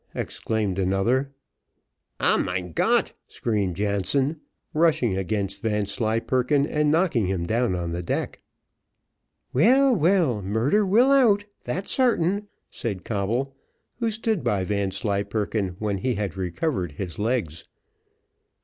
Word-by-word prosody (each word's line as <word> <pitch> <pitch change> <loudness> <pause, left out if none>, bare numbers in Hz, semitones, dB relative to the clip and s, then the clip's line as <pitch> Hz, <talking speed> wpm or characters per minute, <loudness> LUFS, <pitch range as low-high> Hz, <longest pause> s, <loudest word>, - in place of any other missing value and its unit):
exclaimed 105 -4 -2
another. 95 +9 +1 0.9
"Ah, - - +4
Mein 90 -1 -2
Gott!" - - +2
screamed 100 -6 -1
Jansen, 105 - 0 0.3
rushing 150 - +2
against 100 +1 -2
Vanslyperken 115 +6 0
and 150 0 +1
knocking 155 - +2
him 90 -3 -1
down 115 0 +1
on 85 -1 -3
the 85 +1 -3
deck. 85 - -3 1.1
"Well, 255 - +5
well, 165 - +2
murder 110 - +1
will 240 +8 +4
out! 225 -7 +4 0.2
that's 170 +11 -3
sartain," 205 -6 +2 0.2
said 100 -7 -5
Coble, 115 +6 -2 0.4
who 230 -2 +1
stood 220 -3 -1
by 100 -2 +1
Vanslyperken 100 0 -1
when 105 -2 -2
he 125 +4 -1
had 100 -3 -3
recovered 95 - -2
his 90 +3 -6
legs. 105 -8 -2
110 Hz, 115 wpm, -24 LUFS, 95-150 Hz, 1.1 s, Well